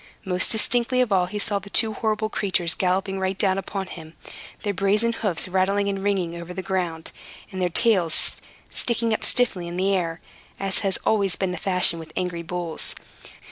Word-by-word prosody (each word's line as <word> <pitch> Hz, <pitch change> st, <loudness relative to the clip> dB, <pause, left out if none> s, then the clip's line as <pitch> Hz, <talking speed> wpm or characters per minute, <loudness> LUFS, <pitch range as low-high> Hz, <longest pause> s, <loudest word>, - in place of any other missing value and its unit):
Most 185 Hz, -1 st, +2 dB
distinctly 240 Hz, +3 st, +2 dB
of 245 Hz, -4 st, 0 dB
all 185 Hz, -2 st, +3 dB
he 210 Hz, -, -5 dB
saw 205 Hz, -1 st, 0 dB
the 200 Hz, +1 st, -12 dB
two 220 Hz, +1 st, +3 dB
horrible 215 Hz, 0 st, -1 dB
creatures 185 Hz, -6 st, +2 dB
galloping 190 Hz, +1 st, 0 dB
right 190 Hz, 0 st, -1 dB
down 195 Hz, -1 st, +1 dB
upon 195 Hz, 0 st, -4 dB
him, 160 Hz, -3 st, -10 dB, 0.5 s
their 205 Hz, -, 0 dB
brazen 205 Hz, +5 st, +2 dB
hoofs 200 Hz, -8 st, 0 dB
rattling 195 Hz, +2 st, +1 dB
and 195 Hz, -1 st, -2 dB
ringing 190 Hz, -4 st, 0 dB
over 170 Hz, +1 st, -8 dB
the 190 Hz, -, -4 dB
ground, 175 Hz, -4 st, -3 dB, 0.4 s
and 190 Hz, -1 st, -4 dB
their 180 Hz, -, +2 dB
tails 185 Hz, -4 st, +2 dB, 0.3 s
sticking 230 Hz, -1 st, 0 dB
up -, -, -2 dB
stiffly 200 Hz, -8 st, +2 dB
into 175 Hz, +2 st, -2 dB
the 195 Hz, +1 st, +2 dB
air, 165 Hz, -2 st, -2 dB, 0.4 s
as 195 Hz, -2 st, +2 dB
has 195 Hz, -2 st, 0 dB
always 200 Hz, -4 st, +2 dB
been 190 Hz, -2 st, -1 dB
the -, -, -3 dB
fashion 180 Hz, -3 st, +3 dB
with 160 Hz, -1 st, -10 dB
angry 180 Hz, -2 st, -2 dB
bulls. 170 Hz, -1 st, -4 dB
190 Hz, 185 wpm, -24 LUFS, 180-205 Hz, 0.5 s, all